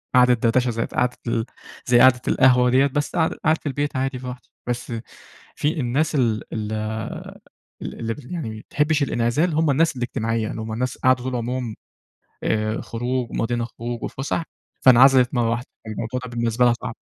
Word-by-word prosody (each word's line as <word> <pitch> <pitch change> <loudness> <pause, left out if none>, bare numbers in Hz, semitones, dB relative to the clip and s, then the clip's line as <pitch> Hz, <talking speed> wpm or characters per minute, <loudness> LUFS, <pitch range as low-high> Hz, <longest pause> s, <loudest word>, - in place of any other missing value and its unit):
قعدة 125 0 +6
دردشة 120 +1 +2
زي 115 0 -1
قعدة 125 0 -1
ال 115 -1 0 0.4
زي 120 -1 +5
قعدة 130 -1 +6
القهوة 125 -2 +5
ديَّة، 130 +3 +4
بس 145 +1 -2
قعدة 160 -2 +1
قاعد 160 0 +3
في - - -32
البيت 145 +1 -2
عادي 130 0 -1
براحتي. 125 -1 -8 0.2
بس 120 0 -3 0.6
في 155 +3 -1
الناس 140 +6 0
ال 115 -6 +1
ال 110 -1 -3 1.1
ال 115 -1 -4
ال 125 +5 -7
يعني 160 -10 -3
ما 110 0 -7
بتحبش 150 0 +2
الإنعزال، 140 +7 +1
هم 160 -1 +3
الناس 160 +2 +2
الاجتماعية 115 -2 -2
اللي - - -5
هم 110 0 -5
الناس 125 +3 -2
قعدوا 130 -1 +2
طول 130 -1 -2
عمرهم، 120 -1 -3 0.7
آآ، 110 0 0
خروج 120 +1 -3
ومقضيينها 120 0 -1
خروج 120 0 -6
وفُسح، 140 +5 -2 0.4
فأنعزلِت 130 0 +6
مرة 120 -3 +1
واحدة، 120 +2 -2 0.2
فالموضوع 110 +3 -4
ده - - -7
بالنسبة 120 0 +1
لها 120 - +5
صعب. 115 - -6
125 Hz, 170 wpm, -22 LUFS, 115-135 Hz, 1.1 s, قعدة